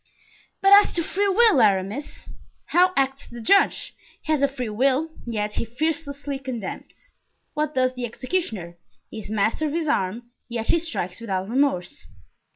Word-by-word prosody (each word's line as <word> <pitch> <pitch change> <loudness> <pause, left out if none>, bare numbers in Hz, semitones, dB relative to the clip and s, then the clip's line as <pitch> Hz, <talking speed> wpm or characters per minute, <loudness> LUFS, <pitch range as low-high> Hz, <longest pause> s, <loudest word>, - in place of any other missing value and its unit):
"But 390 +1 +7
as 405 0 +7
to 340 - 0
free 400 +5 0
will, 410 - +5
Aramis?" 205 +6 0 0.3
"How 365 +1 +4
acts 270 0 0
the 240 - -10
judge? 390 - +3 0.3
He - - -2
has 300 - +1
a 280 - +5
free 265 -3 -5
will, 270 +8 +1 0.2
yet 210 -2 -2
he - - 0
fearlessly 285 +2 -3
condemns. 255 - -7 0.4
What 305 0 -2
does 255 0 +2
the 250 -1 -4
executioner? 220 - -3 0.3
He - - -6
is 205 - -9
master 220 +8 0
of 295 - -4
his 330 -1 -1
arm, 235 -2 -1 0.2
yet 230 -1 -4
he 335 - +4
strikes 230 - -4
without 190 -4 -2
remorse." 270 -1 0
265 Hz, 160 wpm, -24 LUFS, 220-315 Hz, 0.4 s, But